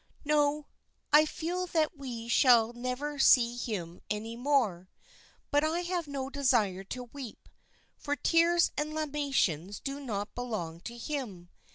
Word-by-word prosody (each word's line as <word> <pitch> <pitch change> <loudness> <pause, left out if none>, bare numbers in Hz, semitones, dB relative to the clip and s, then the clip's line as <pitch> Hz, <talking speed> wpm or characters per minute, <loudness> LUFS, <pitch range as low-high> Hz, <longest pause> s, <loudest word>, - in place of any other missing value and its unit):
"No, 295 0 +2 0.5
I 305 +1 +8
feel 355 +4 -3
that 320 -1 0
we 245 -5 -6
shall 235 -1 +5
never 255 +4 -4
see 240 -3 +5
him 185 -8 -5
any 220 +2 -3
more; 235 -9 +1 0.6
but 290 +1 +3
I 320 +3 +1
have 350 -2 -2
no 275 -2 -4
desire 240 -9 +1
to 250 +5 -6
weep, 270 -6 -9 0.5
for 290 -1 -1
tears 335 +2 +3
and 300 +1 -2
lamentations 275 - -1
do 275 0 -5
not 210 -7 -4
belong 210 -10 -4
to 235 - -6
him. 235 - -5
265 Hz, 140 wpm, -30 LUFS, 225-295 Hz, 0.6 s, I